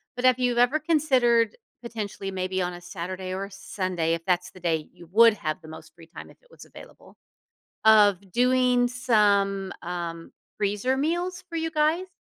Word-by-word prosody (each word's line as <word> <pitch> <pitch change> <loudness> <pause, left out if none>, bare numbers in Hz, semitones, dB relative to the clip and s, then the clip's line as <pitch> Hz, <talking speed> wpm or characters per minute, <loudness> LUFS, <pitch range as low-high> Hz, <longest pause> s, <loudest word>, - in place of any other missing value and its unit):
But 250 - -2
have 255 0 +4
you 245 -1 0
ever 245 +6 +3
considered, 260 - +2 0.3
potentially, 210 -4 -5
maybe 185 0 -2
on 180 0 -2
a 175 - -10
Saturday 185 +1 -6
or 195 +1 -3
a 200 - -13
Sunday, 185 -4 -2
if 165 0 -3
that's 180 -1 0
the 185 - -15
day 160 -3 -1
you 175 -2 -15
would 230 +3 +7
have 155 -3 -4
the 160 - -13
most 160 - -12
free 165 -1 -16
time, - - -11
if - - -18
it - - -27
was - - -14
available, - - -15 0.7
of 210 -4 +6
doing 250 0 +3
some, 205 -5 +1
um, 170 -1 -6 0.2
freezer 210 +6 0
meals 345 +6 -2
for 335 - -6
you 325 0 -2
guys? 320 +4 +1
205 Hz, 180 wpm, -25 LUFS, 180-250 Hz, 0.7 s, would